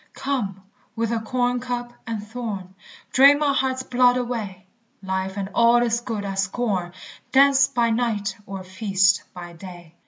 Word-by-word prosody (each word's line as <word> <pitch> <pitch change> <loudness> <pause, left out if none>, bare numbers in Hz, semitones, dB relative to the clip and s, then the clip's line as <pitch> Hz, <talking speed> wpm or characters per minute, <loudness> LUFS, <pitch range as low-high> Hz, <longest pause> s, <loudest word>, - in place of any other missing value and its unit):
Come, 205 -9 -3 0.3
with 230 0 -1
acorn 245 +2 0
cup 245 -1 -4
and 215 -2 -4
thorn, 210 -5 -6 0.4
Drain 280 +2 +7
my 290 -1 +1
heart's 260 -1 0
blood 250 0 +3
away; 220 -7 -4 0.4
Life 190 +1 -3
and 195 -1 -3
all 235 +1 +5
its 235 0 +1
good 225 -4 -4
I 195 - -3
scorn, 195 -2 -1 0.4
Dance 270 -1 +5
by 240 -4 +1
night, 225 -3 -1
or 195 -1 -6
feast 190 0 +2
by 175 -1 -9
day. 175 -1 -12
225 Hz, 150 wpm, -23 LUFS, 195-245 Hz, 0.4 s, Drain